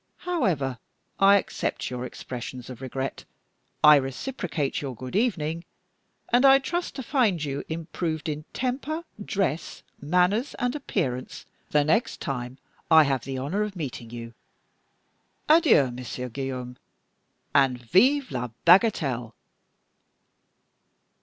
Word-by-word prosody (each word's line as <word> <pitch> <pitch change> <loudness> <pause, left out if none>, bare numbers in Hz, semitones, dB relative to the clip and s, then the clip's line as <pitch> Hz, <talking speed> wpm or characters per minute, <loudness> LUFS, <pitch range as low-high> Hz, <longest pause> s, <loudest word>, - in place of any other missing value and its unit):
However, 170 - 0 0.4
I 195 +1 +7
accept 195 - -3
your 125 0 -4
expressions 125 0 -7
of 125 - -10
regret; 130 +1 -4 0.6
I 150 -1 +9
reciprocate 145 - -3
your 135 -3 -5
'Good 130 +6 -7
evening'; 170 -8 0 0.7
and 245 +2 +5
I 270 0 +8
trust 345 +5 -3
to 265 - -5
find 220 - +1
you 140 -1 -3
improved 160 0 -3
in 150 0 -3
temper, 275 +6 -2 0.2
dress, 190 -7 -2 0.2
manners, 180 - +1
and 245 0 -1
appearance 135 - -3 0.2
the 150 -1 +3
next 160 +11 +1
time 125 -4 -4 0.3
I 160 -1 +8
have 135 -3 -1
the 135 0 -4
honor 145 +11 -2
of 210 -2 -2
meeting 130 -8 -6
you. 115 0 -8 1.1
Adieu, 300 - +5
Monsieur 125 +1 -6
Guillaume, 125 -1 -5 0.8
and! 135 -3 +3
_Vive 255 - +3
la 125 0 -2 0.2
bagatelle!" 150 - +3
150 Hz, 120 wpm, -26 LUFS, 130-210 Hz, 1.1 s, I